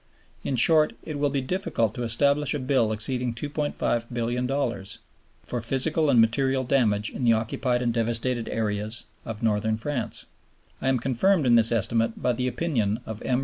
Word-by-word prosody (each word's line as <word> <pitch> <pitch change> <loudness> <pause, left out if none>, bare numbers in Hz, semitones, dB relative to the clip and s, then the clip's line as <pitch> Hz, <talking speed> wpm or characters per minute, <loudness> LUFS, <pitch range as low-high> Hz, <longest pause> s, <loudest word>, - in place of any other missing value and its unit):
In 135 - -1
short, 155 +5 +4
it 150 -3 -5
will 145 0 +2
be 140 -1 -1
difficult 130 - -1
to 125 - -6
establish 140 +5 +2
a - - -2
bill 130 -4 +1
exceeding 120 +2 -1
$2,500,000,000 120 -4 -2 0.5
for 120 - -3
physical 145 +6 +1
and 120 - +5
material 130 +4 +2
damage 110 -5 +1
in - - -5
the 115 -1 +5
occupied 120 +3 -1
and 120 -1 0
devastated 115 +1 -1
areas 105 +1 -2 0.2
of 115 0 -6
Northern 110 0 +1
France. 125 0 -3 0.6
I - - -2
am 130 - +2
confirmed 135 - +1
in 120 - +4
this 115 0 +6
estimate 115 +1 0
by 125 - +1
the 125 +2 -2
opinion 120 -8 -1
of 110 0 -7
M. 125 -1 0
120 Hz, 165 wpm, -25 LUFS, 115-135 Hz, 0.6 s, this